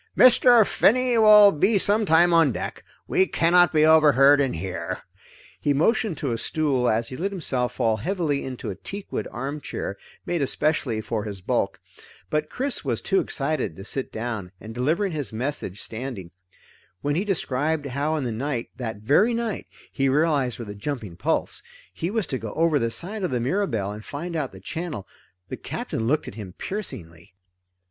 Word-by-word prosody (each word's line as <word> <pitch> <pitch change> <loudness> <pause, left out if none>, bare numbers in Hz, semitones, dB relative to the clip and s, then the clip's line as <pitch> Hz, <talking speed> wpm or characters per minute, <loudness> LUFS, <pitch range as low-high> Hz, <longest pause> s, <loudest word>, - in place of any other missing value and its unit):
"Mr. 245 -2 +7
Finney 250 +4 +3
will 210 -2 +8
be 195 +7 +2
some 205 +2 +3
time 170 +2 +5
on 165 -5 +5
deck. - - -5 0.2
We 190 - +3
cannot 175 +1 +4
be 155 -1 +4
overheard 145 -3 +6
in 135 -2 0
here." 90 +2 -5 0.6
He 145 -1 +1
motioned 185 - +1
to 140 -3 -2
a 115 - -2
stool 135 -6 0
as 115 +2 0
he 130 - -7
let 185 +8 -2
himself 130 -10 -1
fall 115 -3 +1
heavily 155 - -1
into 125 -5 -5
a - - -6
teakwood 200 - -5
armchair 135 -6 -5 0.3
made 175 -3 -1
especially 140 -5 0
for 110 -1 -3
his 100 -2 -6
bulk. 90 - -1 0.5
But 155 0 0
Chris 270 +1 -2
was 120 -6 -1
too 190 - +1
excited 140 - -2
to 95 - -10
sit 135 +3 -2
down, 110 -5 -4
and 110 +2 -9
delivered 160 - 0
his 145 -9 -3
message 115 -4 -4
standing. 110 -7 -6 0.7
When 145 - 0
he 175 +6 0
described 155 -5 -1
how 140 +4 -1
in 150 - -2
the 120 - -2
night 120 +1 -3
that 110 -5 -5
very 190 - +3
night, 230 -4 -3 0.2
he 135 0 +1
realized 140 -3 +1
with 115 -4 -7
a - - -6
jumping 105 -4 -5
pulse 85 - -1 0.3
he 165 - -3
was 220 -1 -1
to 130 - -3
go 110 -1 -6
over 160 -2 +3
the 115 - 0
side 195 - -5
of 180 - 0
the 125 -3 -1
Mirabelle 120 - -1
and 105 +1 -8
find 170 +7 -6
out 145 -5 -2
the 95 - -12
channel, 160 - -5 0.4
the - - -5
Captain 110 - -4
looked 150 +4 +1
at - - -7
him 100 -4 -8
piercingly. 90 - -7
145 Hz, 180 wpm, -24 LUFS, 115-175 Hz, 0.7 s, will